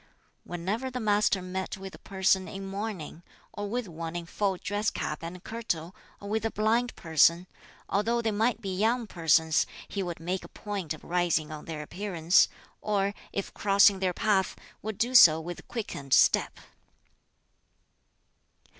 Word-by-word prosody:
Whenever 195 Hz, +9 st, -3 dB
the 250 Hz, 0 st, -4 dB
Master 210 Hz, -3 st, +2 dB
met 190 Hz, +2 st, -4 dB
with 195 Hz, 0 st, -8 dB
a -, -, -12 dB
person 190 Hz, -1 st, +1 dB
in 195 Hz, 0 st, -7 dB
mourning, 195 Hz, -5 st, -5 dB, 0.3 s
or 205 Hz, 0 st, -4 dB
with 240 Hz, 0 st, -2 dB
one 165 Hz, 0 st, -6 dB
in 175 Hz, -1 st, -4 dB
full 195 Hz, +2 st, -1 dB
dress 205 Hz, +3 st, -1 dB
cap 150 Hz, -, -4 dB
and 175 Hz, +2 st, -7 dB
kirtle, 190 Hz, -7 st, -4 dB, 0.2 s
or 200 Hz, -, -9 dB
with 220 Hz, +1 st, -1 dB
a 225 Hz, -, +1 dB
blind 225 Hz, +3 st, +1 dB
person, 165 Hz, +2 st, +3 dB, 0.4 s
although 225 Hz, +4 st, +1 dB
they 225 Hz, -2 st, 0 dB
might 225 Hz, +3 st, +1 dB
be 195 Hz, -3 st, -3 dB
young 230 Hz, +5 st, +1 dB
persons, 160 Hz, -4 st, +2 dB, 0.2 s
he 200 Hz, -, -3 dB
would 175 Hz, -3 st, -4 dB
make 180 Hz, +3 st, -3 dB
a -, -, -9 dB
point 195 Hz, -7 st, -5 dB
of -, -, -17 dB
rising 175 Hz, -3 st, 0 dB
on 155 Hz, -1 st, -8 dB
their 155 Hz, -2 st, -5 dB
appearance, 175 Hz, 0 st, +2 dB, 0.3 s
or, 200 Hz, -1 st, 0 dB, 0.2 s
if 200 Hz, -, -4 dB
crossing 200 Hz, -1 st, +5 dB
their 185 Hz, -1 st, +1 dB
path, 195 Hz, 0 st, +1 dB, 0.3 s
would 215 Hz, -1 st, -5 dB
do 245 Hz, +2 st, 0 dB
so 160 Hz, -10 st, +9 dB
with 175 Hz, +2 st, -8 dB
quickened 145 Hz, -, -1 dB
step! -, -, +3 dB
195 Hz, 160 wpm, -28 LUFS, 170-215 Hz, 0.4 s, so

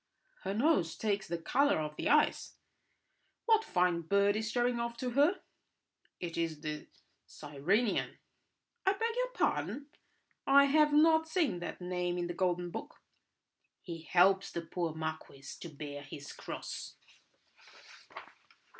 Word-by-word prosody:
"Her 195 Hz, +1 st, -3 dB
nose 230 Hz, -, +2 dB
takes 205 Hz, -3 st, -1 dB
the 170 Hz, -, -2 dB
colour 275 Hz, -, +2 dB
of 150 Hz, -1 st, -4 dB
the -, -, -2 dB
ice. -, -, +2 dB, 0.9 s
What 445 Hz, -1 st, +4 dB
fine 180 Hz, -, +1 dB
bird 200 Hz, +4 st, +2 dB
is 220 Hz, 0 st, -2 dB
showing 245 Hz, +1 st, +1 dB
off 235 Hz, 0 st, -3 dB
to 250 Hz, 0 st, -3 dB
her?" 295 Hz, +9 st, +3 dB, 0.8 s
"It 170 Hz, -2 st, -4 dB
is 160 Hz, -2 st, -2 dB
the 150 Hz, -1 st, -5 dB, 0.4 s
Cyrenian." 165 Hz, -, -1 dB, 0.7 s
"I 385 Hz, -, +3 dB
beg 455 Hz, +3 st, -2 dB
your -, -, 0 dB
pardon! 290 Hz, 0 st, -1 dB, 0.6 s
I 280 Hz, +1 st, +7 dB
have 300 Hz, +1 st, +4 dB
not 320 Hz, +2 st, +5 dB
seen 320 Hz, -, 0 dB
that 175 Hz, -, -6 dB
name 180 Hz, 0 st, -2 dB
in 175 Hz, -, -1 dB
the 175 Hz, -, -4 dB
Golden 175 Hz, -1 st, -1 dB
Book." -, -, -7 dB, 0.8 s
"He 165 Hz, -2 st, -7 dB
helps 190 Hz, +4 st, +3 dB
the 170 Hz, -, -4 dB
poor 165 Hz, -1 st, -3 dB
marquis 160 Hz, -3 st, -6 dB
to 170 Hz, -, -7 dB
bear 145 Hz, -1 st, -7 dB
his 145 Hz, 0 st, -9 dB
cross." -, -, -7 dB
185 Hz, 135 wpm, -32 LUFS, 165-275 Hz, 0.9 s, I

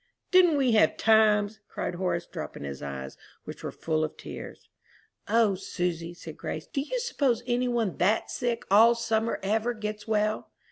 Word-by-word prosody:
"Didn't 360 Hz, -5 st, +6 dB
we 265 Hz, -3 st, +3 dB
have 220 Hz, -, +4 dB
times!" 215 Hz, -1 st, +4 dB
cried -, -, -3 dB
Horace, 175 Hz, -1 st, -1 dB
dropping -, -, -7 dB
his 70 Hz, -1 st, -6 dB
eyes, 65 Hz, -1 st, -6 dB, 0.3 s
which -, -, -9 dB
were -, -, -3 dB
full 155 Hz, -1 st, -1 dB
of 155 Hz, -, -4 dB
tears. -, -, -9 dB, 0.6 s
"O 225 Hz, -3 st, +3 dB
Susy," 175 Hz, -2 st, -3 dB
said 160 Hz, -2 st, -10 dB
Grace, 155 Hz, -, -5 dB
"do 275 Hz, -, -3 dB
you -, -, -3 dB
suppose 285 Hz, -, 0 dB
any 250 Hz, 0 st, +1 dB
one 235 Hz, -6 st, -1 dB
that's 200 Hz, +5 st, +1 dB
sick 240 Hz, -1 st, -2 dB
all 225 Hz, +4 st, +7 dB
summer 225 Hz, -1 st, 0 dB
ever 220 Hz, +4 st, 0 dB
gets 210 Hz, 0 st, -5 dB
well?" 215 Hz, 0 st, 0 dB
215 Hz, 170 wpm, -27 LUFS, 180-235 Hz, 0.6 s, all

